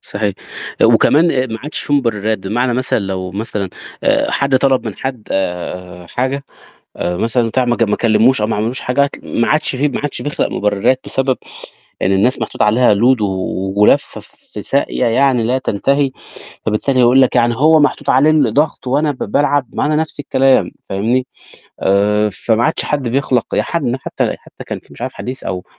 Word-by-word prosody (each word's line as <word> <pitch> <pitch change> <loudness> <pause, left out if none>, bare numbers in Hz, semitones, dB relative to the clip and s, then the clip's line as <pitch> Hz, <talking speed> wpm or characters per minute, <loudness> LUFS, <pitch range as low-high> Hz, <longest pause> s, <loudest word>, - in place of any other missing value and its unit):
صحيح 100 -1 -3 0.5
آآ - - +7
وكمان 165 +4 +4
آآ 130 -3 0
ما 115 -2 -5
عادش 150 - -4
في 145 - -4
مُبرّرات 110 -5 0
بمعنى 120 +4 0
مثلًا 130 +1 0
لو 95 -2 -4
مثلًا 100 0 -3 0.4
آآ - - +2
حد 140 -1 +1
طلب 130 -2 +1
من 105 - -5
حد 130 -5 -5
آآ 90 -1 -4
حاجة 130 +6 -2 0.5
آآ 90 0 -2
مثلًا 115 +3 +1
بتاع 125 +3 +1
ما 120 -1 0
ج - - 0
ما 105 -2 +1
كلّموش 115 +2 +3
أو 105 - +1
ما 110 - -1
عملّوش 115 +5 -2
حاجة 125 +3 +1
هتل 140 - -5
ما 115 - +2
عادش 155 -3 +1
في 145 +3 +1
ما 140 - -4
عادش 145 - -2
بيخلق 145 - -1
مُبرّرات 105 +6 0
بسبب 135 -1 0 0.7
إن 95 - +1
الناس 105 +8 +2
محطوط 115 - -4
عليها 110 +1 +4
load 120 +3 +3
و - - +2
و 95 0 -3
ولافّه 140 +7 +2
في 275 0 -12
سايقة 135 -2 0
يعني 130 0 +2
لا 125 +3 +1
تنتهي، 135 +4 0 0.5
فبالتالي 120 +5 0
هيقول 125 +2 +5
لك، 130 - +2
يعني 120 -1 +3
هو 155 +5 +5
محطوط 145 -1 0
عليه 135 +4 +4
الضغط 145 0 +1
وأنا 145 +4 +1
ب 140 - -11
بالعب 145 +4 0
ما - - 0
هو - - +1
أنا 155 - +1
نَفْس 155 -1 -2
الكلام 135 -1 +2 0.2
فاهمني، 120 +6 0 0.5
آآ 105 +2 +2
فما 115 +3 0
عادش 155 - +1
حد 140 -4 -2
بيخلق 125 -1 0
يا - - +2
حن 135 -7 -2
حتى - - -2
حتى - - -13
كان - - -5
في - - -22
مش - - -11
عارف - - -3
حديث 130 +1 -7
أو 90 -1 -4
125 Hz, 195 wpm, -16 LUFS, 105-140 Hz, 0.7 s, آآ